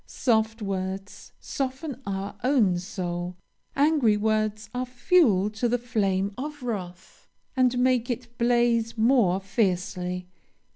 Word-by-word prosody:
Soft 220 -2 0
words 195 0 -5
soften 270 0 -4
our 195 +1 -3
own 230 -10 +3
soul. 180 -2 -4 0.4
Angry 280 -7 +3
words 215 0 0
are 250 +1 -2
fuel 245 - +3
to 220 +3 -1
the 245 - +2
flame 200 -5 0
of 295 0 -6
wrath, 185 -6 -6 0.3
and 255 -1 +3
make 250 -1 +2
it 240 0 -4
blaze 235 -1 +2
more 220 -5 +3
fiercely. 180 -3 -1
220 Hz, 115 wpm, -26 LUFS, 195-250 Hz, 0.4 s, own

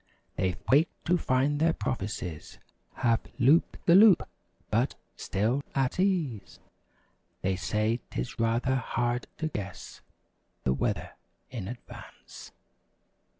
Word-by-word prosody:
They 95 -1 0 0.2
wake 150 +5 +5 0.2
to 175 - +3
find 135 +2 +1
their 165 +1 +3
prophecies 100 - -4 0.4
Have 115 -3 +2 0.2
"looped 135 +6 +3
the 170 - +6
loop"—but, 200 0 +3 0.2
still 115 +8 0
at 135 +4 0
ease. 155 - 0 0.9
They 95 0 +1
say 110 +5 0
'tis - - -5
rather 120 +3 +1
hard 120 0 -1
to 160 - -1
guess 100 - -7 0.6
The 65 - +2
weather - - -2 0.4
in 115 -7 -5
advance. 120 +3 -11
120 Hz, 105 wpm, -29 LUFS, 105-145 Hz, 0.9 s, the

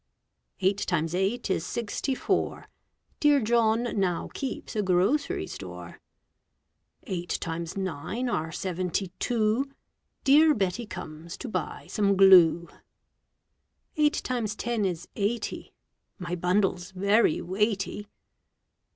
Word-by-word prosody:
Eight 195 +2 +2
times 165 -2 -1
eight 195 +7 0
is 160 - 0
sixty 235 +6 -2
four. - - -1 0.5
Dear 295 -1 +5
John 230 -1 +2 0.2
now 180 -3 0
keeps 270 -3 -5
a 210 - +2
grocery 195 +10 +1
store. - - -9 1.0
Eight 180 -5 -3
times 165 +1 -4
nine 190 - -3
are 160 -9 -1
seventy 185 +1 -2
two. 235 +3 +1 0.5
Dear 300 +2 +6
Betty 205 +3 -1
comes 160 -2 -8
to 270 - -6
buy 220 - -4
some 200 -2 +1
glue. 175 -3 +7 1.3
Eight 300 0 +2
times 230 -5 -2
ten 230 -3 -1
is 175 -2 -3
eighty. 215 +3 -2 0.5
My 180 -2 -5
bundle's 180 0 +1
very 200 +1 +2
weighty. 205 +2 -1
200 Hz, 110 wpm, -27 LUFS, 180-235 Hz, 1.3 s, glue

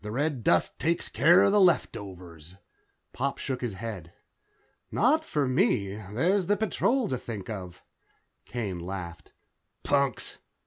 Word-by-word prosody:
The 105 - -5
red 135 +1 -1
dust 85 -3 +2
takes 170 +1 0
care 175 +3 +5
of 195 - +4
the 205 0 +4
leftovers." 90 - -1 0.6
Pop 140 +2 -2
shook 130 -2 -4
his 120 -4 -2
head. 95 -5 -7 0.8
"Not 300 +8 +3
for 150 - -1
me. 125 - +1
There's 160 - 0
the 205 +1 +2
Patrol 235 +3 +1
to 130 -8 -2
think 110 -4 -6
of." 90 -4 -8 0.6
Kane 105 -7 -4
laughed. 85 -3 -7 0.5
"Punks. 140 -2 0
120 Hz, 135 wpm, -28 LUFS, -, 0.8 s, care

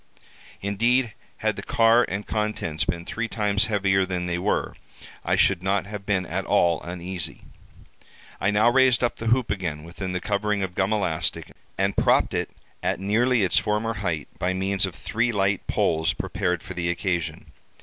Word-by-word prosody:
Indeed, 115 +4 +1 0.2
had - - -1
the - - -4
car 115 +1 +4
and 100 +2 -3
contents 105 -8 -2
been 85 0 -3
three 115 +4 -3
times 105 -1 +1
heavier 95 -2 +2
than 90 -1 -2
they 85 0 -1
were, 100 +4 -1 0.5
I - - +1
should 95 -3 +3
not 95 -1 0
have 100 -1 -8
been 95 -3 +1
at 95 +3 -3
all 85 -2 +2
uneasy. 90 0 -4 1.0
I 95 - +1
now 105 +2 +3
raised 130 -2 +4
up 120 - 0
the 115 - -5
hoop 120 +1 +2
again 85 -6 -3
within 90 +3 -6
the 90 - -1
covering 105 +1 -1
of 90 -2 -4
gum 95 +3 0
elastic, 85 -7 -1 0.3
and 95 +1 +1
propped - - +3
it - - -1 0.3
at - - -1
nearly 115 +4 +2
its 90 - +3
former 105 +2 -1
height 85 -9 -3
by 90 +1 0
means 95 +1 +1
of 90 - -8
three 120 +2 -1
light 95 -2 0
poles 80 0 +1
prepared 90 -4 -2
for 95 - -7
the 85 -1 -2
occasion. 85 -1 -2
100 Hz, 175 wpm, -25 LUFS, 90-105 Hz, 1.0 s, car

